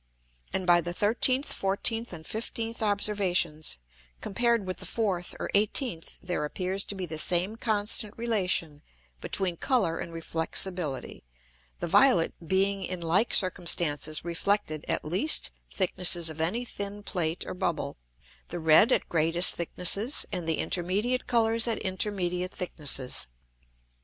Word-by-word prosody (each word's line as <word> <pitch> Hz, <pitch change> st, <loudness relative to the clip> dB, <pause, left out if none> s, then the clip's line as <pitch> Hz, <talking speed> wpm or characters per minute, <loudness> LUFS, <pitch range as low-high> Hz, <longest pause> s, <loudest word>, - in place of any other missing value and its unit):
And 190 Hz, -, -2 dB
by 175 Hz, -1 st, +5 dB
the 175 Hz, +1 st, -5 dB
13th, 255 Hz, +7 st, +3 dB
14th, 225 Hz, +4 st, -1 dB
and 160 Hz, -3 st, -9 dB
15th 225 Hz, +1 st, -4 dB
Observations, 190 Hz, -, 0 dB, 0.4 s
compared 235 Hz, 0 st, +1 dB
with 185 Hz, 0 st, -4 dB
the -, -, -6 dB
4th 190 Hz, -6 st, -2 dB
or -, -, -4 dB
18th 205 Hz, -, +1 dB
there 180 Hz, -4 st, -2 dB
appears 185 Hz, +5 st, -2 dB
to 200 Hz, -, -4 dB
be 190 Hz, -2 st, -4 dB
the 160 Hz, -2 st, -4 dB
same 180 Hz, +6 st, +3 dB
constant 215 Hz, -1 st, -1 dB
relation 185 Hz, -10 st, 0 dB, 0.4 s
between 180 Hz, -, -1 dB
Colour 205 Hz, -, 0 dB
and 170 Hz, -, -6 dB
Reflexibility; 165 Hz, -2 st, -2 dB, 0.6 s
the -, -, -2 dB
violet 175 Hz, -3 st, +4 dB
being 195 Hz, +3 st, +1 dB
in 185 Hz, -1 st, -3 dB
like 175 Hz, +7 st, +2 dB
circumstances 165 Hz, -4 st, +2 dB
reflected 170 Hz, -2 st, -1 dB
at -, -, -2 dB
least 190 Hz, -, +1 dB, 0.2 s
thicknesses 175 Hz, -3 st, +1 dB
of 155 Hz, 0 st, -6 dB
any 225 Hz, +10 st, -1 dB
thin 205 Hz, -2 st, -5 dB
Plate 170 Hz, -4 st, -1 dB
or -, -, -5 dB
Bubble, 180 Hz, -, -2 dB, 0.5 s
the 175 Hz, -, -5 dB
red 160 Hz, +8 st, +5 dB
at -, -, +2 dB
greatest 165 Hz, +2 st, +3 dB
thicknesses, 195 Hz, -, +1 dB
and 165 Hz, -2 st, -3 dB
the 160 Hz, -, +1 dB
intermediate 205 Hz, +8 st, -1 dB
Colours 230 Hz, -1 st, +2 dB
at 230 Hz, -, 0 dB
intermediate 185 Hz, -2 st, -2 dB
thicknesses. 145 Hz, -, -1 dB
185 Hz, 135 wpm, -28 LUFS, 170-210 Hz, 0.6 s, by